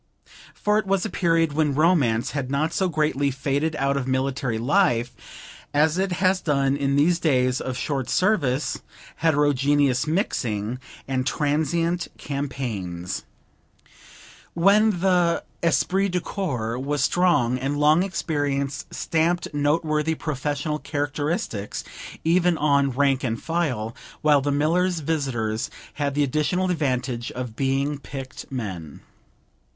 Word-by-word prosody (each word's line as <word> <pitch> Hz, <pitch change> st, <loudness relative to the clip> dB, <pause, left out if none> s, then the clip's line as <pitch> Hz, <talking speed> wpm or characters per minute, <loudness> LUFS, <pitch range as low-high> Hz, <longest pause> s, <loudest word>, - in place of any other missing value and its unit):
For 210 Hz, +1 st, +2 dB
it 205 Hz, -, -4 dB
was 195 Hz, 0 st, +1 dB
a 220 Hz, -, -4 dB
period 165 Hz, -3 st, +2 dB
when 150 Hz, -2 st, +1 dB
romance 135 Hz, -7 st, +2 dB
had 135 Hz, -2 st, -3 dB
not 140 Hz, +3 st, 0 dB
so 190 Hz, -1 st, +1 dB
greatly 150 Hz, -3 st, +1 dB
faded 140 Hz, +4 st, -1 dB
out 140 Hz, -1 st, +1 dB
of 135 Hz, -2 st, -2 dB
military 130 Hz, -2 st, -1 dB
life 125 Hz, -, +2 dB, 0.6 s
as 155 Hz, +4 st, +3 dB
it 190 Hz, -1 st, 0 dB
has 185 Hz, +2 st, +2 dB
done 140 Hz, -3 st, +1 dB
in 140 Hz, -1 st, 0 dB
these 170 Hz, +5 st, +3 dB
days 130 Hz, -5 st, +2 dB
of 130 Hz, -1 st, -4 dB
short 135 Hz, -1 st, -2 dB
service, 160 Hz, -9 st, +1 dB, 0.4 s
heterogeneous 145 Hz, -3 st, +2 dB
mixing, 125 Hz, -, -1 dB, 0.3 s
and 130 Hz, -1 st, -1 dB
transient 165 Hz, +4 st, 0 dB
campaigns; 110 Hz, -11 st, -4 dB, 1.3 s
when 200 Hz, +2 st, +4 dB
the 180 Hz, -3 st, +2 dB, 0.2 s
esprit 190 Hz, +3 st, +2 dB
de 180 Hz, 0 st, 0 dB
corps 125 Hz, -, -3 dB
was 140 Hz, +1 st, -1 dB
strong, 135 Hz, -9 st, +2 dB
and 140 Hz, +3 st, -2 dB
long 150 Hz, +3 st, +4 dB
experience 145 Hz, -6 st, -2 dB
stamped 165 Hz, +2 st, 0 dB
noteworthy 155 Hz, +2 st, +1 dB
professional 150 Hz, +1 st, -2 dB
characteristics 145 Hz, -, -3 dB, 0.4 s
even 175 Hz, +1 st, +3 dB
on 140 Hz, -2 st, +3 dB
rank 135 Hz, 0 st, +1 dB
and 115 Hz, -3 st, -2 dB
file; 135 Hz, -10 st, -1 dB, 0.3 s
while 150 Hz, -2 st, +5 dB
the 145 Hz, +1 st, 0 dB
miller's 165 Hz, +4 st, +1 dB
visitors 130 Hz, -8 st, -1 dB, 0.2 s
had 140 Hz, -2 st, -2 dB
the 145 Hz, -, +3 dB
additional 155 Hz, +7 st, 0 dB
advantage 125 Hz, -6 st, -1 dB
of 125 Hz, -3 st, -5 dB
being 135 Hz, +2 st, 0 dB
picked 135 Hz, -2 st, -8 dB
men. 95 Hz, -, -5 dB
145 Hz, 125 wpm, -24 LUFS, 130-165 Hz, 1.3 s, while